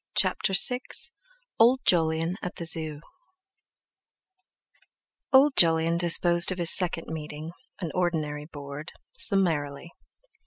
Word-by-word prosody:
CHAPTER 195 Hz, -, 0 dB
VI 250 Hz, +6 st, +5 dB, 0.8 s
OLD 245 Hz, +3 st, +3 dB
JOLYON 165 Hz, 0 st, 0 dB
AT 180 Hz, -, -7 dB
THE 170 Hz, -, -8 dB
ZOO 160 Hz, -2 st, -1 dB, 2.3 s
Old 275 Hz, +1 st, +4 dB
Jolyon 165 Hz, 0 st, +2 dB
disposed 175 Hz, 0 st, +3 dB
of 185 Hz, -, -5 dB
his 170 Hz, -2 st, +7 dB
second 175 Hz, -3 st, 0 dB
Meeting—an 160 Hz, +3 st, -9 dB
ordinary 155 Hz, -5 st, -3 dB
Board—summarily. 150 Hz, -, -3 dB
165 Hz, 90 wpm, -25 LUFS, 155-180 Hz, 2.3 s, his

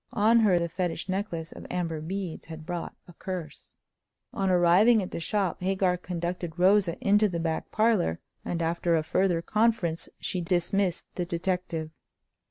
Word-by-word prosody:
On 225 Hz, +3 st, +4 dB
her 205 Hz, -5 st, +4 dB
the 170 Hz, 0 st, 0 dB
fetish 175 Hz, 0 st, -3 dB
necklace 185 Hz, -4 st, -3 dB
of -, -, -10 dB
amber 165 Hz, -3 st, -2 dB
beads 185 Hz, +1 st, -5 dB
had 160 Hz, -1 st, -9 dB
brought 175 Hz, -1 st, -4 dB
a 175 Hz, -, -13 dB
curse. 180 Hz, -2 st, -7 dB, 0.6 s
On 195 Hz, -1 st, 0 dB
arriving 185 Hz, +6 st, +5 dB
at 180 Hz, -, -7 dB
the -, -, -4 dB
shop 190 Hz, 0 st, -1 dB
Hagar 185 Hz, -1 st, +1 dB
conducted 175 Hz, -1 st, -4 dB
Rosa 185 Hz, -1 st, +4 dB
into 210 Hz, +1 st, +5 dB
the 170 Hz, -2 st, -3 dB
back 165 Hz, -1 st, -2 dB
parlor; 215 Hz, -, +2 dB, 0.2 s
and 170 Hz, -1 st, -2 dB
after 170 Hz, +1 st, +1 dB
a 160 Hz, -, +1 dB
further 175 Hz, 0 st, +1 dB
conference 210 Hz, -7 st, +1 dB
she 180 Hz, -, -2 dB
dismissed 180 Hz, +2 st, 0 dB
the 180 Hz, -, -2 dB
detective. 170 Hz, -2 st, -2 dB
180 Hz, 160 wpm, -27 LUFS, 170-195 Hz, 0.6 s, arriving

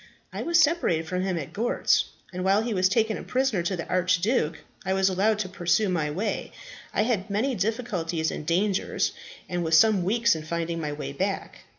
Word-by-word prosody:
"I -, -, -4 dB
was 340 Hz, +1 st, +3 dB
separated 300 Hz, -, +2 dB
from 180 Hz, +2 st, -1 dB
him 185 Hz, -2 st, -1 dB
at 145 Hz, -5 st, -6 dB
Gortz, 230 Hz, +4 st, +2 dB, 0.3 s
and 180 Hz, 0 st, -3 dB
while 195 Hz, +3 st, +3 dB
he 230 Hz, -1 st, -2 dB
was 185 Hz, -1 st, +3 dB
taken 220 Hz, +1 st, +1 dB
a -, -, -8 dB
prisoner 255 Hz, -7 st, 0 dB
to 175 Hz, +3 st, -1 dB
the 170 Hz, -, -5 dB
archduke, 185 Hz, -1 st, +1 dB, 0.3 s
I 190 Hz, -1 st, 0 dB
was 190 Hz, 0 st, +3 dB
allowed 200 Hz, +3 st, +2 dB
to 210 Hz, -3 st, -2 dB
pursue 185 Hz, +3 st, +1 dB
my 160 Hz, -5 st, 0 dB
way. 185 Hz, +9 st, -3 dB, 0.4 s
I -, -, +1 dB
had 215 Hz, -4 st, -1 dB
many 220 Hz, +7 st, 0 dB
difficulties 190 Hz, -7 st, -1 dB
and -, -, -5 dB
dangers, 185 Hz, +5 st, 0 dB, 0.4 s
and 175 Hz, -1 st, -2 dB
was 160 Hz, 0 st, +4 dB
some 215 Hz, 0 st, +5 dB
weeks 230 Hz, +4 st, +3 dB
in 160 Hz, -, -5 dB
finding 165 Hz, +1 st, -3 dB
my 150 Hz, -1 st, -3 dB
way 145 Hz, -1 st, -5 dB
back. 195 Hz, +6 st, -3 dB
190 Hz, 200 wpm, -26 LUFS, 170-220 Hz, 0.4 s, some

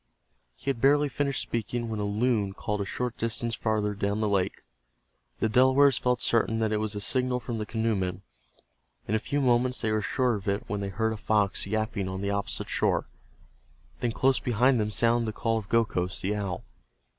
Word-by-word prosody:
He 140 Hz, -, -2 dB
had 115 Hz, -4 st, -7 dB
barely 145 Hz, +1 st, +4 dB
finished 140 Hz, +1 st, -1 dB
speaking 120 Hz, +1 st, -3 dB
when 110 Hz, -2 st, -3 dB
a 105 Hz, -, -1 dB
loon 105 Hz, -1 st, 0 dB
called 105 Hz, -1 st, -2 dB
a -, -, -2 dB
short 125 Hz, +4 st, -3 dB
distance 115 Hz, +1 st, -1 dB
farther 110 Hz, -2 st, 0 dB
down 100 Hz, +1 st, -1 dB
the 110 Hz, -, +1 dB
lake. 100 Hz, -2 st, 0 dB, 0.8 s
The -, -, +2 dB
Delawares 130 Hz, +3 st, +5 dB
felt 125 Hz, -1 st, 0 dB
certain 115 Hz, -1 st, +2 dB
that 110 Hz, -1 st, 0 dB
it 105 Hz, -, +1 dB
was 110 Hz, -1 st, -2 dB
a -, -, -2 dB
signal 125 Hz, +3 st, +1 dB
from 115 Hz, -1 st, -4 dB
the 105 Hz, -, -4 dB
canoemen. 100 Hz, -5 st, -1 dB, 0.8 s
In 105 Hz, -, -2 dB
a 110 Hz, -, +3 dB
few 140 Hz, +6 st, -2 dB
moments 125 Hz, -1 st, +2 dB
they 110 Hz, -, 0 dB
were 110 Hz, 0 st, +1 dB
sure 125 Hz, +4 st, +1 dB
of 105 Hz, -1 st, -5 dB
it 100 Hz, +1 st, 0 dB
when 105 Hz, -3 st, -2 dB
they 100 Hz, -1 st, -3 dB
heard 110 Hz, +3 st, -1 dB
a -, -, -6 dB
fox 105 Hz, -2 st, +1 dB
yapping 110 Hz, -2 st, -2 dB
on 95 Hz, 0 st, -4 dB
the 100 Hz, 0 st, -1 dB
opposite 100 Hz, 0 st, -2 dB
shore. -, -, 0 dB, 0.9 s
Then 120 Hz, -, 0 dB
close 130 Hz, +3 st, +2 dB
behind 125 Hz, +1 st, +2 dB
them 105 Hz, -1 st, 0 dB
sounded 115 Hz, +2 st, +2 dB
the 110 Hz, -, -5 dB
call 115 Hz, -1 st, +1 dB
of 100 Hz, -, -11 dB
Gokhos, 100 Hz, -5 st, +1 dB
the 100 Hz, +3 st, 0 dB
owl. 100 Hz, -4 st, -3 dB
110 Hz, 200 wpm, -27 LUFS, 100-120 Hz, 0.9 s, Delawares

